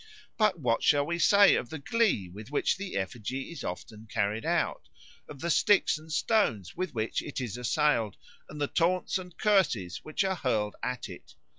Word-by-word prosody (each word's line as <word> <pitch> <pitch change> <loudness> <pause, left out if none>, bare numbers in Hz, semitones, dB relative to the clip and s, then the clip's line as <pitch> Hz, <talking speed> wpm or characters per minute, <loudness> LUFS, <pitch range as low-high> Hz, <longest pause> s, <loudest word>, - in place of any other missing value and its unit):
But 215 -5 +2
what 120 -5 +1
shall 145 -1 +3
we 170 +2 -2
say 200 +5 +6
of 120 - -1
the 160 - -5
glee 185 - +1
with 105 +6 -11
which 145 - +1
the 195 0 -6
effigy 120 - -4
is 170 - -7
often 105 +5 -7
carried 105 +3 -1
out, - - -1 0.4
of 140 - -10
the 170 +1 0
sticks 200 -4 +3
and 160 +1 -13
stones 155 - +1
with 180 -5 -4
which 110 0 -1
it 145 - -6
is 120 -4 -4
assailed, 125 -3 +1 0.3
and 150 - -9
the 145 - +1
taunts 180 +5 +1
and 180 -2 -11
curses 155 - +2
which 155 +5 -1
are 190 -1 -1
hurled 110 -7 -1
at 125 -2 -3
it? 90 -4 -12
145 Hz, 185 wpm, -29 LUFS, 110-180 Hz, 0.4 s, say